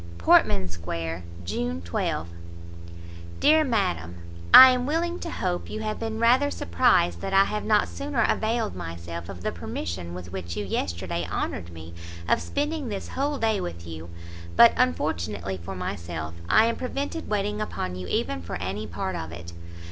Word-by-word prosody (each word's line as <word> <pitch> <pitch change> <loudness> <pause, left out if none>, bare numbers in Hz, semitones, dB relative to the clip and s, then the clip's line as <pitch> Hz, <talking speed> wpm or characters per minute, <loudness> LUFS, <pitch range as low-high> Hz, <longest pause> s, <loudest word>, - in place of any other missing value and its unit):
PORTMAN 95 +3 +4
SQUARE, 85 -1 -5 0.2
June 85 -3 -2
12. 85 -1 -2 1.1
DEAR 315 +1 +5
MADAM, 190 - -1 0.4
I 260 0 +12
am 250 0 0
willing 340 +3 -1
to 335 - -5
hope 180 - -2
you 215 - -5
have 215 -1 -3
been 225 -1 -3
rather 250 +5 +4
surprised 85 - +2
that 195 - -2
I 195 - +7
have 210 +1 -3
not 210 -1 +3
sooner 280 -4 -1
availed 220 - 0
myself 85 0 -7
of 90 -3 -8
the - - 0
permission 85 +1 -5
with 90 -1 -8
which 85 -3 -5
you 105 - -2
yesterday 85 -2 -2
honoured 85 - -3
me 80 0 -10 0.3
of - - +3
spending 295 -2 -2
this 200 -2 -5
whole 285 +2 -1
day 220 -4 +1
with 85 0 -6
you, 80 0 -8 0.5
but, - - +8
unfortunately 95 +3 -1
for 95 +3 -6
myself, 85 -3 -5 0.2
I 220 - +6
am 230 - 0
prevented 280 +5 -4
waiting 210 0 -1
upon 90 - -3
you 90 0 -6
even 90 +1 -1
for 85 - -6
any 100 +4 -4
part 90 +1 -3
of 80 0 -5
it. 85 0 -9
95 Hz, 165 wpm, -26 LUFS, -, 1.1 s, I